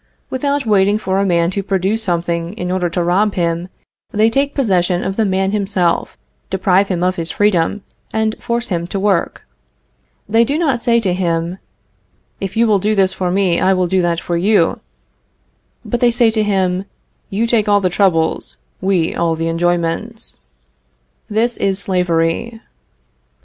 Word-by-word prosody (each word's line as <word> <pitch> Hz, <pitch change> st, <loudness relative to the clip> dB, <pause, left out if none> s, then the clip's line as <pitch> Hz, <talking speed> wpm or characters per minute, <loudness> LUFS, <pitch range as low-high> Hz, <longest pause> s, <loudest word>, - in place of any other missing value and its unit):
Without 280 Hz, +1 st, -1 dB
waiting 205 Hz, -1 st, +3 dB
for 190 Hz, -2 st, -1 dB
a 200 Hz, -, +1 dB
man 170 Hz, -1 st, +2 dB
to 200 Hz, -, -2 dB
produce 195 Hz, +3 st, -1 dB
something 170 Hz, -2 st, -2 dB
in 180 Hz, -4 st, -4 dB
order 180 Hz, -1 st, 0 dB
to 170 Hz, +1 st, -1 dB
rob 195 Hz, +4 st, +1 dB
him, 170 Hz, 0 st, -1 dB, 0.4 s
they 215 Hz, +2 st, +2 dB
take 280 Hz, +3 st, 0 dB
possession 185 Hz, -8 st, +1 dB
of 190 Hz, -, -3 dB
the 220 Hz, -, +1 dB
man 190 Hz, 0 st, 0 dB
himself, 195 Hz, -4 st, -1 dB, 0.3 s
deprive 190 Hz, +1 st, +2 dB
him 180 Hz, -2 st, -1 dB
of 185 Hz, +1 st, 0 dB
his 165 Hz, -1 st, -3 dB
freedom, 205 Hz, 0 st, +1 dB, 0.3 s
and 220 Hz, 0 st, 0 dB
force 235 Hz, 0 st, -2 dB
him 170 Hz, -2 st, -2 dB
to 195 Hz, -, -3 dB
work. 195 Hz, -3 st, 0 dB, 0.8 s
They 225 Hz, +3 st, +4 dB
do 280 Hz, +6 st, -1 dB
not 280 Hz, -8 st, 0 dB
say 235 Hz, 0 st, +3 dB
to 190 Hz, -5 st, 0 dB
him, 170 Hz, 0 st, -1 dB, 0.8 s
"If 195 Hz, +2 st, -5 dB
you 230 Hz, -, +4 dB
will 210 Hz, -3 st, +3 dB
do 210 Hz, +3 st, 0 dB
this 190 Hz, -1 st, +2 dB
for 185 Hz, -1 st, -2 dB
me, 185 Hz, -2 st, +1 dB
I 190 Hz, +1 st, +4 dB
will 185 Hz, -1 st, +1 dB
do 185 Hz, +1 st, +1 dB
that 170 Hz, -1 st, 0 dB
for 170 Hz, -, -3 dB
you," 185 Hz, -1 st, +2 dB, 1.1 s
but 240 Hz, -, -2 dB
they 245 Hz, -, +4 dB
say 235 Hz, -1 st, +3 dB
to 220 Hz, -1 st, +1 dB
him, 190 Hz, -2 st, 0 dB, 0.4 s
"You 210 Hz, +4 st, 0 dB
take 225 Hz, -3 st, +1 dB
all 205 Hz, 0 st, +5 dB
the 185 Hz, -2 st, 0 dB
troubles; 165 Hz, -4 st, +1 dB, 0.2 s
we 185 Hz, -4 st, +1 dB
all 165 Hz, -1 st, 0 dB
the 165 Hz, +1 st, -2 dB
enjoyments." 175 Hz, +6 st, -2 dB, 0.9 s
This 230 Hz, +3 st, +1 dB
is 195 Hz, -1 st, 0 dB
slavery. 180 Hz, +3 st, 0 dB
190 Hz, 170 wpm, -17 LUFS, 175-215 Hz, 1.1 s, all